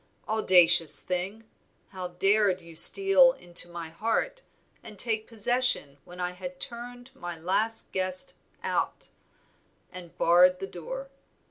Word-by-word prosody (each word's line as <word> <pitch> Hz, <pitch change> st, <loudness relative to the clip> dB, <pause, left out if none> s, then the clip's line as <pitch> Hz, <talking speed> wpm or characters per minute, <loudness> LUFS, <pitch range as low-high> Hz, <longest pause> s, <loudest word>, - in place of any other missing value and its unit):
Audacious 175 Hz, -7 st, +4 dB
thing! 185 Hz, +5 st, -4 dB, 0.5 s
how 185 Hz, -1 st, -7 dB
dared 195 Hz, +2 st, +1 dB
you 170 Hz, -2 st, -15 dB
steal 395 Hz, -, +6 dB
into 175 Hz, -, -4 dB
my 170 Hz, -1 st, -8 dB
heart 230 Hz, -, -3 dB, 0.4 s
and 210 Hz, -, -12 dB
take 220 Hz, 0 st, +1 dB
possession 230 Hz, -, -1 dB
when 180 Hz, +1 st, -13 dB
I 180 Hz, 0 st, -2 dB
had 270 Hz, +9 st, -9 dB
turned 245 Hz, +1 st, -5 dB
my 175 Hz, -6 st, -7 dB
last 210 Hz, +7 st, -2 dB
guest 185 Hz, -1 st, -3 dB, 0.3 s
out -, -, -3 dB, 0.8 s
and 180 Hz, -3 st, -12 dB
barred 180 Hz, +2 st, +4 dB
the 195 Hz, -, -6 dB
door? 265 Hz, +10 st, -9 dB
190 Hz, 125 wpm, -27 LUFS, 175-235 Hz, 0.8 s, steal